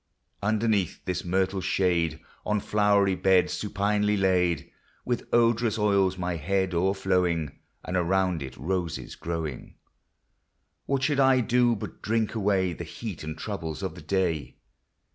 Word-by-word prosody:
LTxderxeath 105 Hz, -3 st, +1 dB
this 90 Hz, -, -2 dB
myrtle 95 Hz, +2 st, 0 dB
shade, 85 Hz, -5 st, +1 dB, 0.2 s
On 105 Hz, 0 st, 0 dB
flowery 100 Hz, -1 st, +3 dB
beds 95 Hz, -1 st, +3 dB
supinely 105 Hz, 0 st, 0 dB
laid, 90 Hz, -5 st, +1 dB, 0.3 s
With 120 Hz, -1 st, -2 dB
odorous 115 Hz, -1 st, +3 dB
oils 100 Hz, -3 st, +2 dB
my 90 Hz, -1 st, -2 dB
head 95 Hz, +3 st, 0 dB
o'erflowing, 90 Hz, -4 st, 0 dB, 0.3 s
And 90 Hz, -, -3 dB
around 90 Hz, -1 st, +1 dB
it 65 Hz, -2 st, -7 dB
roses 85 Hz, +3 st, -3 dB
growing, 80 Hz, -5 st, -5 dB, 1.1 s
What 135 Hz, -1 st, 0 dB
should 145 Hz, 0 st, +1 dB
I 130 Hz, -1 st, +5 dB
do 120 Hz, 0 st, +3 dB
but 100 Hz, -, -8 dB
drink 110 Hz, 0 st, 0 dB
away 95 Hz, -4 st, +1 dB
The 85 Hz, -, -6 dB
heat 95 Hz, +2 st, -7 dB
and 80 Hz, 0 st, -5 dB
troubles 80 Hz, -8 st, -5 dB
of -, -, -3 dB
the -, -, -11 dB
day 85 Hz, -8 st, -1 dB
95 Hz, 135 wpm, -27 LUFS, 85-105 Hz, 1.1 s, I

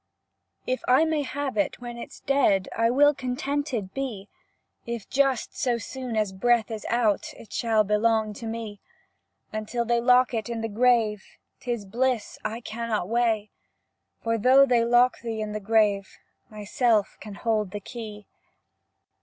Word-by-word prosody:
If 255 Hz, -, -1 dB
I 260 Hz, +6 st, +5 dB
may 315 Hz, -2 st, 0 dB
have 285 Hz, 0 st, -4 dB
it 305 Hz, -, 0 dB
when 240 Hz, -1 st, -7 dB
it's -, -, -10 dB
dead 230 Hz, -9 st, +2 dB
I 230 Hz, 0 st, +2 dB
will 290 Hz, +4 st, +5 dB
contented 260 Hz, -4 st, -3 dB
be; 235 Hz, -8 st, -5 dB, 0.6 s
If 235 Hz, -3 st, -5 dB
just 270 Hz, -3 st, +1 dB, 0.2 s
as 235 Hz, -3 st, 0 dB
soon 255 Hz, -3 st, -5 dB
as 210 Hz, -3 st, 0 dB
breath 230 Hz, +3 st, +2 dB
is 220 Hz, -1 st, -5 dB
out 230 Hz, -4 st, +1 dB
It 220 Hz, -, -13 dB
shall 225 Hz, -3 st, +2 dB
belong 215 Hz, +1 st, +1 dB
to 225 Hz, +2 st, -7 dB
me, 225 Hz, -2 st, -6 dB, 0.7 s
Until 215 Hz, +2 st, -2 dB
they 235 Hz, 0 st, +1 dB
lock 250 Hz, +1 st, +4 dB
it 225 Hz, 0 st, -2 dB
in 230 Hz, -1 st, -3 dB
the 225 Hz, -, -3 dB
grave, 220 Hz, -2 st, +2 dB, 0.4 s
'T 245 Hz, -, -4 dB
is 230 Hz, -4 st, -3 dB
bliss 240 Hz, +2 st, -1 dB
I 225 Hz, +2 st, -4 dB
cannot 220 Hz, -4 st, -3 dB
weigh, 225 Hz, -3 st, +1 dB, 0.7 s
For 230 Hz, 0 st, 0 dB
though 260 Hz, +5 st, +6 dB
they 245 Hz, -3 st, +3 dB
lock 240 Hz, +1 st, +3 dB
thee 230 Hz, -2 st, -4 dB
in 215 Hz, -1 st, -3 dB
the 215 Hz, -, -3 dB
grave, 205 Hz, -2 st, +1 dB, 0.3 s
Myself 215 Hz, +1 st, 0 dB
can 210 Hz, -2 st, -9 dB
hold 215 Hz, -2 st, 0 dB
the 205 Hz, +2 st, -5 dB
key. 210 Hz, -1 st, -9 dB
230 Hz, 160 wpm, -26 LUFS, 215-250 Hz, 0.7 s, though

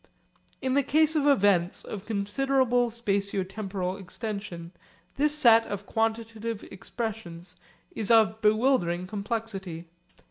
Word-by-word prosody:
In 260 Hz, -1 st, 0 dB
the 280 Hz, -, +4 dB
case 310 Hz, +3 st, +2 dB
of 290 Hz, -2 st, +2 dB
events 200 Hz, -9 st, +3 dB
of 210 Hz, -1 st, -7 dB
considerable 245 Hz, +3 st, +1 dB
spatio 200 Hz, -4 st, 0 dB
temporal 190 Hz, -2 st, -4 dB
extension 200 Hz, -3 st, -6 dB, 0.4 s
this 300 Hz, +1 st, +2 dB
set 230 Hz, -4 st, +6 dB
of 205 Hz, 0 st, -5 dB
quantitative 225 Hz, 0 st, -2 dB
expressions 185 Hz, -5 st, -6 dB, 0.4 s
is 215 Hz, -3 st, -2 dB
of 220 Hz, -1 st, +4 dB
bewildering 210 Hz, -6 st, +2 dB
complexity. 200 Hz, -4 st, -5 dB
215 Hz, 110 wpm, -27 LUFS, 195-235 Hz, 0.4 s, set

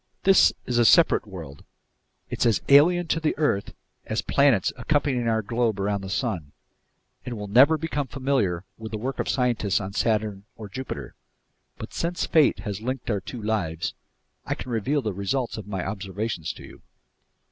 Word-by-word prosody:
"This 195 Hz, -1 st, +6 dB
is 120 Hz, -1 st, 0 dB
a -, -, +5 dB
separate 165 Hz, -2 st, +5 dB
world. 80 Hz, -8 st, -9 dB, 0.6 s
It's -, -, 0 dB
as 115 Hz, -, +3 dB
alien 175 Hz, +6 st, +6 dB
to 165 Hz, -, +1 dB
the 160 Hz, -1 st, -1 dB
earth 145 Hz, -10 st, 0 dB, 0.3 s
as 110 Hz, -, -3 dB
the -, -, -6 dB
planets 135 Hz, -9 st, +4 dB
accompanying 130 Hz, -1 st, 0 dB
our 110 Hz, -1 st, +1 dB
globe 115 Hz, -1 st, 0 dB
around 100 Hz, 0 st, -1 dB
the 95 Hz, -, -7 dB
sun, 95 Hz, -, -2 dB, 0.7 s
and 120 Hz, -2 st, -5 dB
we'll 105 Hz, -, -5 dB
never 130 Hz, +10 st, +5 dB
become 150 Hz, -3 st, -3 dB
familiar 130 Hz, -11 st, -1 dB
with 110 Hz, -1 st, -7 dB
the 110 Hz, -, -3 dB
work 130 Hz, +5 st, -4 dB
of -, -, -1 dB
scientists 120 Hz, -6 st, +1 dB
on 100 Hz, -1 st, -6 dB
Saturn 105 Hz, -2 st, 0 dB
or 105 Hz, -2 st, -9 dB
Jupiter. 130 Hz, +6 st, -6 dB, 0.6 s
But -, -, -8 dB
since 175 Hz, +1 st, -1 dB
fate 150 Hz, -10 st, +3 dB
has 105 Hz, -1 st, -5 dB
linked 125 Hz, 0 st, -3 dB
our 100 Hz, -2 st, -1 dB
two 115 Hz, +4 st, -8 dB
lives, 90 Hz, -7 st, -1 dB, 0.5 s
I -, -, -2 dB
can 125 Hz, -, -7 dB
reveal 130 Hz, +6 st, 0 dB
the 105 Hz, -3 st, -2 dB
results 105 Hz, +7 st, -2 dB
of 110 Hz, -2 st, -8 dB
my 95 Hz, -3 st, -3 dB
observations 100 Hz, -3 st, -3 dB
to -, -, -12 dB
you." -, -, -13 dB
110 Hz, 180 wpm, -25 LUFS, 100-135 Hz, 0.7 s, This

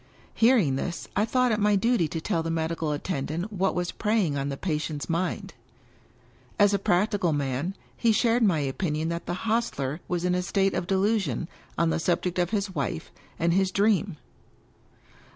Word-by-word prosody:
Hearing 225 Hz, -, +4 dB
this, 170 Hz, +4 st, -4 dB
I 205 Hz, -, +3 dB
thought 255 Hz, +1 st, +2 dB
it 215 Hz, -, +1 dB
my 210 Hz, 0 st, +3 dB
duty 230 Hz, -3 st, +2 dB
to 165 Hz, -, -4 dB
tell 165 Hz, +1 st, -1 dB
the 165 Hz, -, -3 dB
medical 165 Hz, -1 st, -1 dB
attendant 165 Hz, +5 st, -3 dB
what 195 Hz, 0 st, 0 dB
was 180 Hz, 0 st, -1 dB
preying 210 Hz, -8 st, +1 dB
on 140 Hz, 0 st, -2 dB
the 140 Hz, -, -4 dB
patient's 155 Hz, -4 st, -3 dB
mind. 175 Hz, +2 st, -2 dB, 1.0 s
As 205 Hz, -1 st, +5 dB
a 200 Hz, -, +2 dB
practical 185 Hz, -1 st, +1 dB
man, 145 Hz, +6 st, -2 dB, 0.2 s
he 230 Hz, -, +2 dB
shared 230 Hz, +2 st, +2 dB
my 195 Hz, -7 st, +4 dB
opinion 155 Hz, +3 st, -1 dB
that 170 Hz, 0 st, -4 dB
the 175 Hz, -, -1 dB
hostler 180 Hz, -, -1 dB
was 180 Hz, 0 st, -1 dB
in 180 Hz, -, +2 dB
a 180 Hz, -, +1 dB
state 195 Hz, +1 st, +1 dB
of 175 Hz, -, -2 dB
delu 200 Hz, +4 st, +2 dB
sion 165 Hz, -, -3 dB, 0.3 s
on 170 Hz, -1 st, +2 dB
the -, -, 0 dB
subject 175 Hz, +1 st, 0 dB
of 175 Hz, -1 st, +1 dB
his 200 Hz, -2 st, -1 dB
Wife 135 Hz, -, -3 dB, 0.3 s
and 170 Hz, +1 st, +2 dB
his 190 Hz, +1 st, +3 dB
Dream. 200 Hz, -3 st, +1 dB
180 Hz, 180 wpm, -26 LUFS, 160-205 Hz, 1.0 s, As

